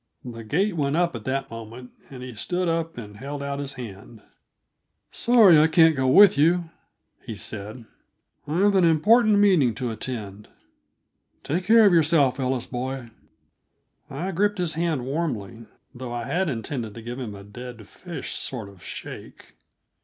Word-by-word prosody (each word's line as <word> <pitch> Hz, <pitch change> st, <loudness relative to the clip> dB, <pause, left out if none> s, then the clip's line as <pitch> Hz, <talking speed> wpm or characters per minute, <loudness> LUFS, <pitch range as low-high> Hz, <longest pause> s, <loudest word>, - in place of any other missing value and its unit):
The 115 Hz, -2 st, -8 dB
gate 180 Hz, -, 0 dB
went 145 Hz, -2 st, 0 dB
up 175 Hz, 0 st, +1 dB
at 115 Hz, -, -8 dB
that 135 Hz, -1 st, -2 dB
moment, 115 Hz, +2 st, -9 dB, 0.2 s
and 130 Hz, -2 st, -9 dB
he 125 Hz, -1 st, -8 dB
stood 180 Hz, +11 st, -2 dB
up 165 Hz, -2 st, -2 dB
and 105 Hz, -3 st, -9 dB
held 140 Hz, +4 st, -6 dB
out 140 Hz, 0 st, -4 dB
his 140 Hz, -1 st, -5 dB
hand. 110 Hz, -2 st, -10 dB, 0.9 s
"Sorry 220 Hz, -9 st, +6 dB
I 155 Hz, -, +5 dB
can't 160 Hz, 0 st, +5 dB
go 130 Hz, -1 st, 0 dB
over 130 Hz, -, +3 dB
with 200 Hz, -8 st, +7 dB
you," 170 Hz, +2 st, +2 dB, 0.5 s
he 115 Hz, -, -7 dB
said. 110 Hz, +2 st, -8 dB, 0.6 s
"I've 190 Hz, +7 st, +2 dB
an 190 Hz, -2 st, +4 dB
important 210 Hz, +7 st, +4 dB
meeting 180 Hz, -, +4 dB
to 120 Hz, +1 st, -3 dB
attend. 105 Hz, -3 st, -6 dB, 1.0 s
Take 175 Hz, +5 st, -2 dB
care 225 Hz, +2 st, +6 dB
of 200 Hz, -, +5 dB
yourself, 150 Hz, -5 st, +3 dB
Ellie 130 Hz, -2 st, -1 dB
boy." 130 Hz, -1 st, -4 dB, 1.0 s
I 170 Hz, +8 st, -4 dB
gripped 205 Hz, +3 st, 0 dB
his 175 Hz, -4 st, -1 dB
hand 160 Hz, -5 st, -1 dB
warmly, 115 Hz, -7 st, -4 dB, 0.3 s
though 125 Hz, 0 st, -7 dB
I 120 Hz, -1 st, -4 dB
had 175 Hz, +7 st, -1 dB
intended 115 Hz, -3 st, -5 dB
to 115 Hz, -, -9 dB
give 120 Hz, +2 st, -6 dB
him 110 Hz, -6 st, -6 dB
a 100 Hz, -, -11 dB
dead 115 Hz, +1 st, -10 dB
fish 175 Hz, -3 st, -8 dB
sort 115 Hz, -6 st, -5 dB
of 100 Hz, -3 st, -17 dB
shake. -, -, -9 dB
135 Hz, 165 wpm, -24 LUFS, 115-170 Hz, 1.0 s, with